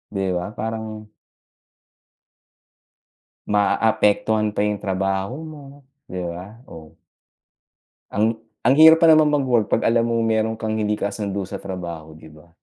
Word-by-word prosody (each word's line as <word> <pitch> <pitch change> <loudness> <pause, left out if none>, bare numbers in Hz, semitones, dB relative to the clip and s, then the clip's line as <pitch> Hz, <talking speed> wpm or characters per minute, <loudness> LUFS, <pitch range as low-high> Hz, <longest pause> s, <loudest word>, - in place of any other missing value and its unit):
Di 95 - -1 0.2
ba? 90 - -3
Parang 110 -1 -5 2.4
Maaapektuhan 105 +1 +1
pa - - -2
yong 105 -1 -3
trabaho 95 +4 -2 0.2
mo, 150 -2 -11 0.5
'di 90 0 -5
ba? 90 +7 -9
Oh. 80 -2 -12 1.2
Ang 110 +2 0 0.2
ang 130 - +5
hirap 160 +2 +8
pa - - +6
naman 155 -1 +6
mag-work, 130 -7 +1
'pag - - +1
alam 115 0 +2
mong 115 -1 0
meron 110 0 0
kang 110 -1 -3
hindi 105 0 0
kasundo 100 -1 -3
sa 100 - -7
trabaho, 85 -5 -7
'di 80 0 -14
ba? 75 +2 -18
105 Hz, 135 wpm, -21 LUFS, 95-115 Hz, 2.4 s, hirap